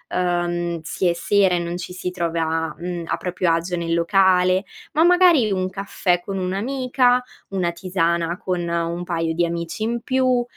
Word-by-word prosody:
uhm, 175 Hz, -1 st, -1 dB
si 185 Hz, -, -3 dB
è 170 Hz, -, +3 dB
sera 190 Hz, +2 st, +2 dB
e -, -, 0 dB
non 170 Hz, +1 st, -3 dB
ci 180 Hz, 0 st, -7 dB
si 180 Hz, 0 st, -4 dB
trova, 165 Hz, -2 st, -1 dB
mhmm, 175 Hz, 0 st, -4 dB
a -, -, -1 dB
proprio 180 Hz, -1 st, -1 dB
agio 170 Hz, +2 st, 0 dB
nel 165 Hz, -1 st, -2 dB
locale; 185 Hz, +1 st, +3 dB, 0.3 s
ma 315 Hz, -, +4 dB
magari, 345 Hz, -, +5 dB
un 185 Hz, -1 st, 0 dB
caffè 190 Hz, -2 st, -1 dB
con 195 Hz, +1 st, -5 dB
un'amica, 250 Hz, +6 st, +1 dB, 0.3 s
una 185 Hz, -3 st, -1 dB
tisana 170 Hz, -1 st, -1 dB
con 180 Hz, -2 st, -2 dB
un 170 Hz, +1 st, -2 dB
paio 165 Hz, -2 st, -1 dB
di 175 Hz, 0 st, +2 dB
amici 170 Hz, +4 st, -4 dB
in 235 Hz, +1 st, -1 dB
più; 255 Hz, -1 st, +2 dB
180 Hz, 170 wpm, -22 LUFS, 170-195 Hz, 0.3 s, magari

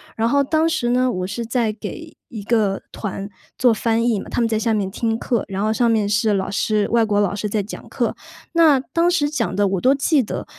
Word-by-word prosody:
然 225 Hz, +1 st, +1 dB
后 280 Hz, +1 st, +3 dB
当 320 Hz, +3 st, +1 dB
时 275 Hz, -7 st, -1 dB
呢， 250 Hz, 0 st, +2 dB
我 185 Hz, -2 st, -3 dB
是 230 Hz, +4 st, -4 dB
在 230 Hz, -2 st, 0 dB
给 -, -, -8 dB
一 220 Hz, -4 st, -7 dB
个 210 Hz, -4 st, +1 dB
团 200 Hz, -1 st, -5 dB, 0.3 s
做 245 Hz, -3 st, +4 dB
翻 230 Hz, +1 st, 0 dB
译 220 Hz, -4 st, +1 dB
嘛， -, -, -8 dB
他 -, -, -1 dB
们 230 Hz, -, +2 dB
在 220 Hz, -1 st, 0 dB
下 225 Hz, 0 st, 0 dB
面 200 Hz, -3 st, -1 dB
听 225 Hz, +1 st, -1 dB
课， 235 Hz, -2 st, -1 dB
然 195 Hz, 0 st, -4 dB
后 215 Hz, -, +1 dB
上 235 Hz, +1 st, +2 dB
面 215 Hz, -3 st, +2 dB
是 210 Hz, +1 st, +2 dB
老 195 Hz, 0 st, -1 dB
师， 215 Hz, 0 st, 0 dB
外 230 Hz, -1 st, +3 dB
国 205 Hz, -1 st, +1 dB
老 200 Hz, -2 st, +1 dB
师 210 Hz, +1 st, -3 dB
在 205 Hz, 0 st, -1 dB
讲 210 Hz, -, -9 dB
课。 -, -, -1 dB, 0.4 s
那 315 Hz, -5 st, +5 dB
当 335 Hz, +6 st, 0 dB
时 290 Hz, -5 st, +1 dB
讲 265 Hz, -7 st, -2 dB
的 205 Hz, 0 st, +2 dB
我 190 Hz, -2 st, -1 dB
都 265 Hz, +2 st, +4 dB
记 280 Hz, +1 st, +2 dB
得， -, -, -5 dB
225 Hz, 260 characters per minute, -20 LUFS, 205-250 Hz, 0.4 s, 那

